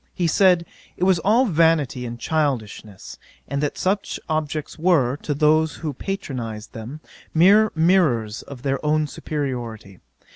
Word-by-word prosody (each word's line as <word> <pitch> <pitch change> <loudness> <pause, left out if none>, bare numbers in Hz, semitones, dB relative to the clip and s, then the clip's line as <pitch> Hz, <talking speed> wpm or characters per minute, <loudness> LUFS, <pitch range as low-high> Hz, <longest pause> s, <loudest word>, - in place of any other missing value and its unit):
He 175 - -1
said, 180 +1 +4 0.3
it - - -2
was 185 -2 +4
all 225 +9 +3
vanity 160 - +2
and 120 0 -7
childishness: 120 - -3 0.3
and 140 0 -2
that 150 - -2
such 195 +2 -1
objects 155 -1 -3
were, 155 -8 +2
to 145 -1 -3
those 155 +2 +2
who 155 -3 -5
patronised 125 - -5
them, 120 +7 -8 0.3
mere 205 +6 +5
mirrours 155 - +2
of 135 -3 -11
their 135 0 -1
own 155 0 +2
superiority. 120 - -5
150 Hz, 140 wpm, -22 LUFS, 125-170 Hz, 0.3 s, mere